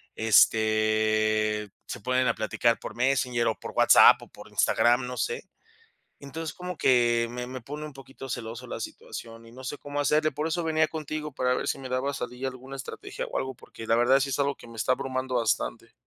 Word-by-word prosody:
este, 110 Hz, -1 st, +3 dB, 0.2 s
se -, -, -7 dB
ponen 125 Hz, +2 st, +1 dB
a 115 Hz, -, +2 dB
platicar 115 Hz, +2 st, +1 dB
por -, -, -8 dB
Messenger 125 Hz, -2 st, +1 dB
o 110 Hz, -, +1 dB
por -, -, -7 dB
WhatsApp -, -, +7 dB
o -, -, -11 dB
por -, -, -13 dB
Instagram, 120 Hz, +1 st, +3 dB
no 125 Hz, -, -5 dB
sé. 470 Hz, -, -2 dB, 0.7 s
Entonces, 150 Hz, +2 st, -6 dB
como 180 Hz, -1 st, -6 dB
que 120 Hz, -2 st, +3 dB
me 125 Hz, 0 st, -5 dB
me 130 Hz, 0 st, -7 dB
pone 150 Hz, +5 st, -7 dB
un 150 Hz, -, -12 dB
poquito 135 Hz, 0 st, -11 dB
celoso 120 Hz, +1 st, -5 dB
la -, -, -5 dB
situación 115 Hz, 0 st, -8 dB
y 115 Hz, -, -14 dB
no 130 Hz, +2 st, -12 dB
sé 145 Hz, -, -4 dB
cómo 145 Hz, 0 st, -5 dB
hacerle. 150 Hz, +2 st, +2 dB
Por 150 Hz, +3 st, -2 dB
eso 170 Hz, +1 st, -1 dB
venía 155 Hz, -1 st, +2 dB
contigo, 155 Hz, -1 st, -5 dB
para 125 Hz, -1 st, +1 dB
ver -, -, -3 dB
si -, -, -1 dB
me 130 Hz, -1 st, -7 dB
daba 130 Hz, +2 st, -1 dB
salida 125 Hz, +1 st, -4 dB
alguna 130 Hz, +1 st, -10 dB
estrategia 410 Hz, -, -6 dB
o -, -, -4 dB
algo, 130 Hz, -1 st, -4 dB
porque 115 Hz, -1 st, -11 dB
la 115 Hz, -, +4 dB
verdad 125 Hz, +3 st, +4 dB
sí 135 Hz, 0 st, -1 dB
es 135 Hz, -, -1 dB
algo 140 Hz, 0 st, +1 dB
que -, -, -14 dB
me 115 Hz, -1 st, -12 dB
está 125 Hz, -, +1 dB
abrumando 130 Hz, -1 st, -3 dB
bastante. 115 Hz, -2 st, -1 dB
130 Hz, 210 wpm, -27 LUFS, 115-140 Hz, 0.7 s, WhatsApp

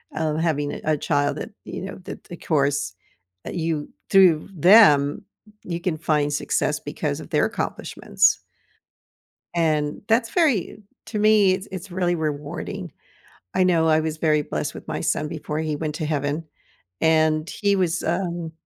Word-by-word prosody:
uh, 155 Hz, -1 st, -1 dB
having 155 Hz, -3 st, 0 dB
a 155 Hz, -1 st, +1 dB
child 145 Hz, 0 st, 0 dB
that, -, -, -6 dB
you -, -, -6 dB
know, 195 Hz, -, -6 dB
that -, -, -8 dB
the 175 Hz, -, -9 dB
course 140 Hz, -, 0 dB, 0.5 s
that -, -, -5 dB
you 160 Hz, -3 st, -2 dB, 0.2 s
through 185 Hz, -4 st, +5 dB
them 155 Hz, -5 st, +6 dB, 0.4 s
you 170 Hz, -1 st, -4 dB
can 170 Hz, -4 st, -1 dB
find 150 Hz, -2 st, +1 dB
success 145 Hz, -, 0 dB
because -, -, -3 dB
of -, -, -10 dB
their -, -, +3 dB
accomplishments. -, -, 0 dB, 1.2 s
And 155 Hz, -3 st, 0 dB
that's 230 Hz, +1 st, +2 dB
very 295 Hz, -, +1 dB, 0.3 s
to 215 Hz, -, -4 dB
me, 210 Hz, -2 st, +5 dB
it's 190 Hz, +2 st, -4 dB
it's 185 Hz, 0 st, -7 dB
really 175 Hz, -1 st, 0 dB
rewarding. 160 Hz, +4 st, -4 dB, 0.6 s
I 185 Hz, -, +4 dB
know 170 Hz, -3 st, +3 dB
I 155 Hz, 0 st, +4 dB
was 155 Hz, 0 st, -3 dB
very 155 Hz, -2 st, +2 dB
blessed 75 Hz, -, -3 dB
with -, -, -11 dB
my -, -, -3 dB
son 150 Hz, -, 0 dB
before 150 Hz, 0 st, -4 dB
he 155 Hz, -1 st, -1 dB
went 150 Hz, 0 st, -3 dB
to 155 Hz, -, -3 dB
heaven. 150 Hz, +1 st, -1 dB, 0.6 s
And 155 Hz, 0 st, +3 dB
he 200 Hz, -1 st, +1 dB
was, 180 Hz, -2 st, 0 dB
um, 170 Hz, -1 st, -2 dB
160 Hz, 160 wpm, -23 LUFS, 150-180 Hz, 1.2 s, them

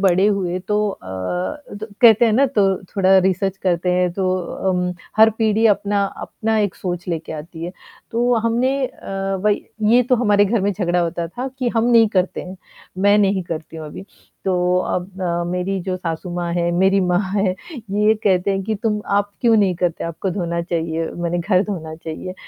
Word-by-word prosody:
बड़े 190 Hz, 0 st, +4 dB
हुए, 190 Hz, -4 st, 0 dB
तो 210 Hz, +3 st, 0 dB
अ, -, -, -9 dB, 1.0 s
कहते 230 Hz, -1 st, +7 dB
हैं 225 Hz, -, +3 dB
ना, 270 Hz, +6 st, +4 dB
त 195 Hz, -2 st, +2 dB
थोड़ा 190 Hz, 0 st, +5 dB
रिसर्च 190 Hz, +1 st, +1 dB
करते 180 Hz, -1 st, 0 dB
हैं 180 Hz, 0 st, +2 dB
तो 190 Hz, +2 st, -2 dB, 0.5 s
उम, 180 Hz, 0 st, 0 dB, 0.2 s
हर 220 Hz, +1 st, +7 dB
पीढ़ी 220 Hz, 0 st, +3 dB
अपना 205 Hz, -1 st, +2 dB, 0.2 s
अपना 220 Hz, 0 st, -1 dB
एक 205 Hz, -3 st, 0 dB
सोच 175 Hz, -1 st, -5 dB
लेकर 165 Hz, -2 st, -3 dB
आती 160 Hz, +2 st, -8 dB
है। 175 Hz, -, -5 dB, 0.4 s
तो 240 Hz, +1 st, +2 dB
हमने 250 Hz, +4 st, +1 dB
अ, 195 Hz, -4 st, -4 dB
भई 210 Hz, -1 st, +2 dB, 0.3 s
ये 245 Hz, +2 st, +6 dB
तो 250 Hz, +1 st, +2 dB
हमारे 205 Hz, -3 st, +3 dB
घर 215 Hz, +2 st, +1 dB
में 200 Hz, +2 st, +1 dB
झगड़ा 180 Hz, -2 st, 0 dB
होता 170 Hz, 0 st, -2 dB
था 250 Hz, +9 st, -5 dB
कि 255 Hz, -2 st, 0 dB
हम 225 Hz, -, +3 dB
नहीं 230 Hz, -2 st, +6 dB
करते 185 Hz, -3 st, 0 dB
हैं, 185 Hz, +1 st, -9 dB, 0.4 s
मैं 205 Hz, +2 st, +4 dB
नहीं 195 Hz, -2 st, +2 dB
करती 165 Hz, -1 st, -6 dB
हूँ 160 Hz, -1 st, -7 dB
अभी, 150 Hz, -, -9 dB, 0.4 s
तो 180 Hz, -1 st, +1 dB
अब 185 Hz, +1 st, -3 dB
अ, 175 Hz, -1 st, -1 dB
मेरी 185 Hz, +2 st, -2 dB
जो 185 Hz, 0 st, -2 dB
सासू 175 Hz, 0 st, -4 dB
माँ 175 Hz, -1 st, -2 dB
हैं, 175 Hz, 0 st, +1 dB
मेरी 190 Hz, +3 st, +3 dB
माँ 180 Hz, 0 st, +2 dB
हैं, 195 Hz, -2 st, +1 dB, 0.4 s
ये 210 Hz, +2 st, +3 dB
कहते 190 Hz, -1 st, +2 dB
हैं 195 Hz, 0 st, -1 dB
कि 220 Hz, -, -1 dB
तुम 210 Hz, 0 st, -1 dB, 0.2 s
आप 205 Hz, 0 st, 0 dB
क्यों 230 Hz, -2 st, +4 dB
नहीं 195 Hz, -3 st, +3 dB
करते? 175 Hz, -1 st, -1 dB
आपको 170 Hz, +3 st, -3 dB
धोना 170 Hz, -2 st, -2 dB
चाहिए, 165 Hz, -1 st, -2 dB
माने 175 Hz, 0 st, -1 dB
घर 185 Hz, +1 st, +2 dB
धोना 160 Hz, -6 st, -5 dB
चाहिए, 165 Hz, +3 st, -7 dB
190 Hz, 190 wpm, -20 LUFS, 175-210 Hz, 1.0 s, कहते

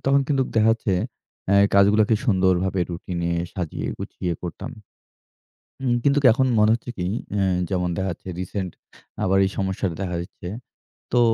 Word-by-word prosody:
তখন 140 Hz, +1 st, +4 dB
কিন্তু 135 Hz, -2 st, +2 dB
দেখা 110 Hz, 0 st, +5 dB
যাচ্ছে 110 Hz, -4 st, -1 dB, 0.5 s
অ্যা 100 Hz, -, +5 dB, 0.2 s
কাজগুলাকে 105 Hz, +2 st, +5 dB
সুন্দরভাবে 95 Hz, -3 st, +2 dB
রুটিনে 85 Hz, 0 st, -3 dB, 0.2 s
সাজিয়ে 90 Hz, -5 st, -4 dB
গুছিয়ে 90 Hz, -, -3 dB
করতাম। 90 Hz, -, -6 dB, 1.1 s
হুম? 125 Hz, -2 st, +1 dB
কিন্তু 145 Hz, 0 st, +3 dB
এখন 130 Hz, +2 st, +2 dB
মনে 105 Hz, +1 st, +5 dB
হচ্ছে 120 Hz, +1 st, -4 dB
কি? 90 Hz, -1 st, -1 dB, 0.3 s
অ্যা 100 Hz, -1 st, +1 dB, 0.3 s
যেমন 90 Hz, -2 st, 0 dB
দেখা 95 Hz, -, -1 dB
যাচ্ছে 85 Hz, -, -10 dB
রিসেন্ট 95 Hz, 0 st, -3 dB, 0.5 s
আবার 95 Hz, -1 st, +3 dB
এই 95 Hz, -, 0 dB
সমস্যাটা 95 Hz, -2 st, -1 dB
দেখা 90 Hz, -2 st, -2 dB
দিচ্ছে। 90 Hz, 0 st, -9 dB, 0.7 s
তো 125 Hz, -, +5 dB
95 Hz, 150 wpm, -23 LUFS, 90-110 Hz, 1.1 s, দেখা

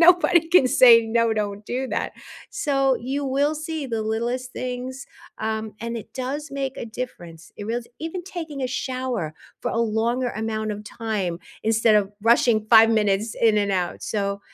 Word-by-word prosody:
Nobody 345 Hz, -1 st, +5 dB
can 340 Hz, -6 st, +6 dB
say, 240 Hz, -2 st, +7 dB
"No, 230 Hz, 0 st, +2 dB
don't 205 Hz, -1 st, -2 dB
do 260 Hz, +2 st, -2 dB
that." -, -, -2 dB, 0.4 s
So, 275 Hz, -9 st, +1 dB
you 270 Hz, +4 st, -3 dB
will 280 Hz, +3 st, +1 dB
see 310 Hz, -1 st, -4 dB
the 230 Hz, -3 st, -2 dB
littlest 240 Hz, +3 st, -2 dB
things, 255 Hz, +1 st, -5 dB, 0.3 s
um, 220 Hz, -1 st, -3 dB
and 230 Hz, +1 st, -4 dB
it 225 Hz, -, -9 dB
does 275 Hz, +4 st, -4 dB
make 275 Hz, -1 st, -3 dB
a -, -, -5 dB
difference. 175 Hz, -9 st, -8 dB
It 205 Hz, -, -7 dB
reals 235 Hz, +1 st, -3 dB
even 330 Hz, +3 st, -4 dB
taking 325 Hz, -7 st, -6 dB
a -, -, +1 dB
shower 255 Hz, -, -3 dB, 0.3 s
for -, -, -2 dB
a 230 Hz, -, -1 dB
longer 235 Hz, +3 st, 0 dB
amount 220 Hz, -1 st, -3 dB
of 210 Hz, 0 st, -8 dB
time 210 Hz, -6 st, -3 dB, 0.2 s
instead 220 Hz, 0 st, +3 dB
of 205 Hz, -1 st, +1 dB
rushing 230 Hz, -1 st, +4 dB
5 225 Hz, -1 st, +8 dB
minutes 210 Hz, 0 st, +1 dB
in 220 Hz, -2 st, +4 dB
and 200 Hz, -1 st, +1 dB
out. 180 Hz, -2 st, -2 dB
So, 200 Hz, -2 st, -2 dB
235 Hz, 175 wpm, -23 LUFS, 215-265 Hz, 0.4 s, 5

